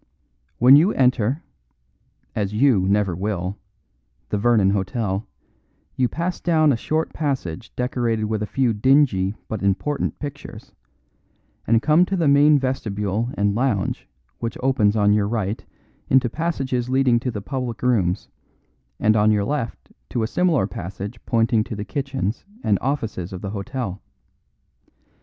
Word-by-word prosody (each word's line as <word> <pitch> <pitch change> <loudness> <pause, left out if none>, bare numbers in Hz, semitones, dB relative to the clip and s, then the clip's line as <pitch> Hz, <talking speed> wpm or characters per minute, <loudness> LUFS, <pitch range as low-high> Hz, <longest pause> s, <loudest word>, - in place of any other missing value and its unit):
When 125 +3 +8
you 165 +8 +5
enter 130 +2 +1 0.9
(as 105 -1 -2
you 110 -6 +3
never 100 -3 +1
will) 95 0 -3 0.7
the 105 - 0
Vernon 105 -3 +3
Hotel, 100 +1 -2 0.7
you 125 - +2
pass 170 +3 -3
down 155 -3 +3
a - - +2
short 155 +7 -2
passage 130 - -3
decorated 120 -3 -1
with 110 0 -2
a 105 - -2
few 125 -2 +1
dingy 110 -5 +3
but 110 - -4
important 100 +9 -1
pictures, 140 -6 -8 0.9
and 115 0 +3
come 155 +3 +5
to 195 - -1
the 165 -3 +2
main 145 +1 +6
vestibule 110 -4 -2
and 100 0 +1
lounge 115 -4 -1 0.3
which 115 -1 -4
opens 120 -6 +2
on 105 -1 +4
your 105 -1 +2
right 105 -2 -2 0.5
into 130 -3 +3
passages 135 -7 -2
leading 130 -2 +3
to 125 - -3
the 110 -4 -4
public 125 +1 -5
rooms, 100 -7 +1 0.7
and 110 0 +3
on 105 0 +4
your 105 -2 +2
left 130 -2 -4 0.2
to 120 - -1
a - - 0
similar 160 - +2
passage 100 +4 -7
pointing 115 -1 +2
to 110 - -6
the 105 0 -5
kitchens 135 -6 -3 0.2
and 100 -2 +2
offices 115 -9 -3
of 95 - -7
the 100 - -4
hotel. 105 -1 -4
115 Hz, 145 wpm, -22 LUFS, 105-135 Hz, 0.9 s, When